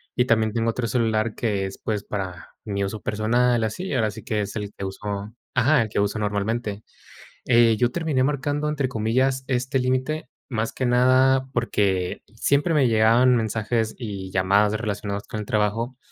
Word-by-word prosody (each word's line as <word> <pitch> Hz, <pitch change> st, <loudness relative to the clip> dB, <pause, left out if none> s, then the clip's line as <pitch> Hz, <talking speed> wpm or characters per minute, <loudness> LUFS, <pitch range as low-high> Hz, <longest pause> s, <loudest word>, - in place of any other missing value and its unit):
y 125 Hz, -, +3 dB
también 110 Hz, -3 st, +2 dB
tengo 115 Hz, 0 st, +1 dB
otro 115 Hz, +1 st, -2 dB
celular 110 Hz, -1 st, 0 dB
que 100 Hz, -4 st, -1 dB
es, 95 Hz, -, -9 dB
pues, 105 Hz, -2 st, -2 dB
para 95 Hz, -4 st, -6 dB
mi 100 Hz, -2 st, -2 dB
uso 105 Hz, +2 st, -5 dB
personal, 120 Hz, +3 st, +1 dB
así, 145 Hz, -, -3 dB
ahora 115 Hz, -5 st, +1 dB
sí 110 Hz, +1 st, -10 dB
que 105 Hz, -1 st, -1 dB
es 100 Hz, -1 st, -5 dB
el 105 Hz, -1 st, -4 dB
que 100 Hz, -, -6 dB
uso 100 Hz, +2 st, -5 dB, 0.2 s
Ajá, 130 Hz, 0 st, +4 dB
el 110 Hz, -, -6 dB
que 100 Hz, -, -1 dB
uso 100 Hz, +2 st, 0 dB
normalmente, 105 Hz, +1 st, -2 dB, 0.6 s
eh, 115 Hz, -2 st, +5 dB
yo 120 Hz, +2 st, +2 dB
terminé 155 Hz, -4 st, 0 dB
marcando, 145 Hz, +2 st, -1 dB
entre 145 Hz, -3 st, 0 dB
comillas, 130 Hz, +4 st, 0 dB
este 130 Hz, +1 st, 0 dB
límite, 130 Hz, +5 st, -1 dB, 0.2 s
más 115 Hz, -2 st, -1 dB
que 130 Hz, -, -2 dB
nada 130 Hz, +2 st, +4 dB
porque 100 Hz, -6 st, 0 dB
siempre 140 Hz, -, +1 dB
me 140 Hz, -4 st, +4 dB
llegaban 115 Hz, +3 st, +4 dB
mensajes 110 Hz, 0 st, -1 dB
y 100 Hz, -6 st, -6 dB
llamadas 100 Hz, +3 st, +3 dB
de -, -, 0 dB
relacionadas 105 Hz, -2 st, -4 dB
con 110 Hz, -, -5 dB
el -, -, -7 dB
trabajo, 110 Hz, +4 st, 0 dB
115 Hz, 180 wpm, -24 LUFS, 105-125 Hz, 0.6 s, eh